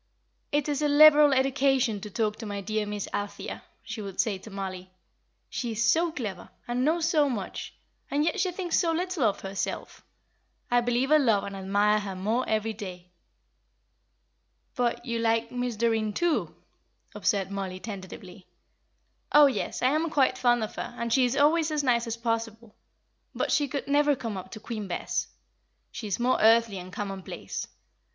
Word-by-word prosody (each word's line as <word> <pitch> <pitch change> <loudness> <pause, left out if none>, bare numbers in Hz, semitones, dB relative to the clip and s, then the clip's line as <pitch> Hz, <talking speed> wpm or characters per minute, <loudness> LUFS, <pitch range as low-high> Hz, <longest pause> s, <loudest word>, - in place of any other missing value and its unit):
"It 290 0 +1
is 290 -1 -1
a 300 - +2
liberal 295 0 +8
education 265 -4 +2
to 210 - -7
talk 215 0 -1
to 225 - -7
my 205 -1 -4
dear 215 +1 -2
Miss 205 -1 -4
Althea," 205 0 -4 0.2
she 220 - -6
would 195 -2 -8
say 205 -4 +1
to 220 - -12
Mollie. 190 -2 -6 0.6
"She 240 -3 -3
is 225 +2 0
so 330 +9 +3
clever, 205 - -6 0.2
and 245 +1 0
knows 325 +3 +2
so 300 -4 +3
much, 210 -7 -5 0.3
and 290 +2 +1
yet 335 +5 0
she 370 -1 +1
thinks 355 -1 0
so 335 -3 +2
little 360 -1 -2
of 210 -3 +1
herself. 195 0 -5 0.7
I 245 0 +4
believe 245 +3 0
I 310 - +8
love 225 -9 +3
and 200 - -6
admire 205 +2 +2
her 195 -2 -5
more 220 +7 -1
every 220 0 0
day." 180 -4 -9 1.6
"But 245 -1 -1
you 235 -1 -2
like 230 0 +1
Miss 245 -1 -2
Doreen, 220 -1 +1
too?" 345 +6 0 0.6
observed 195 -2 0
Mollie, 190 -2 -4
tentatively. 190 -2 -9 0.8
"Oh, 295 0 +8
yes, 270 -2 -1
I 255 - +5
am 315 +3 +1
quite 270 -4 +2
fond 240 -2 +2
of 215 - -5
her, - - -5
and 235 -1 -1
she 260 -2 +4
is 250 +3 -1
always 310 +2 +4
as 300 -1 -1
nice 240 -3 +2
as 230 0 -3
possible. 230 -1 -3 0.6
But - - -1
she 290 -1 +2
could 275 +1 -4
never 290 0 +3
come 230 -4 -5
up 185 - -7
to 215 - -7
Queen 215 -2 -5
Bess; 175 - -2 0.6
she 220 - -6
is 200 - -2
more 250 +2 +2
earthly 225 -2 +4
and 180 +1 -9
commonplace. 195 -1 -5
230 Hz, 175 wpm, -27 LUFS, 205-280 Hz, 1.6 s, liberal